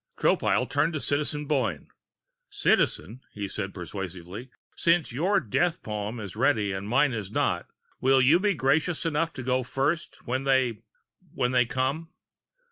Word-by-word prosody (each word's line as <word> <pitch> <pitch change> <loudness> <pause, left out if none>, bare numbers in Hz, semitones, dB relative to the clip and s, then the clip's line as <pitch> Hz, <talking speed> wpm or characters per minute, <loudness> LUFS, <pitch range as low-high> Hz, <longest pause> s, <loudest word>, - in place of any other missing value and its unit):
Tropile - - +2
turned 165 +2 +1
to 155 - -2
Citizen 150 +3 -1
Boyne. 130 - -1 0.6
"Citizen," 110 - +1
he 100 -1 -4
said 95 0 -4
persuasively, 95 +4 -7 0.3
"since 170 -3 +2
your 180 - +2
death 170 - 0
poem 105 +2 -4
is 100 -3 -7
ready 110 -4 +2
and 95 +2 -4
mine 130 +3 +3
is 105 -4 -4
not, - - 0 0.3
will 135 +1 +4
you 140 +7 +5
be 200 0 +1
gracious 155 +5 +1
enough 165 +1 0
to 130 - -6
go 130 +1 +1
first 140 +6 -2
when 130 +2 -1
they 130 -5 +2 0.6
when 125 - +1
they 125 -2 +3
come?" 135 +7 -1
130 Hz, 150 wpm, -27 LUFS, 105-150 Hz, 0.6 s, you